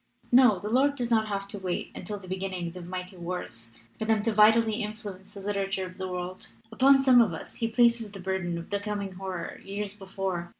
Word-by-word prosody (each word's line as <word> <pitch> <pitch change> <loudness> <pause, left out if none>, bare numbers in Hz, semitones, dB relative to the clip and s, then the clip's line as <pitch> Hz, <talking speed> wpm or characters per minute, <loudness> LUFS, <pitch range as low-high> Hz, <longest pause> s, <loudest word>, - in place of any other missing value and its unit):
"No, 245 -5 +7
the 200 - -6
Lord 270 +5 +3
does 245 -3 -3
not 220 -1 +3
have 200 -1 -3
to 205 - -4
wait 185 -2 -3
until 205 +3 -5
the 190 -2 -12
beginnings 185 -2 -3
of 175 -1 -8
mighty 185 +1 -6
wars 145 -10 -5 0.3
for 220 - -1
them 220 -1 +2
vitally 220 0 +5
to - - -1
in 210 0 -2
fluence 205 -2 -9
the 200 - -10
literature 195 -1 -1
of 185 +1 -11
the 190 - -3
world. 180 0 -5 0.2
Upon 270 +5 +6
some 260 -2 +6
of 200 -8 +2
us - - -9
He 230 - 0
places 235 -2 +3
the 200 - -9
burden 185 -2 -2
of 170 - -8
the 200 - +1
coming 200 -1 -3
horror 185 -2 -6
years 200 0 -4
before. 190 -3 -4
200 Hz, 220 wpm, -28 LUFS, 185-220 Hz, 0.3 s, No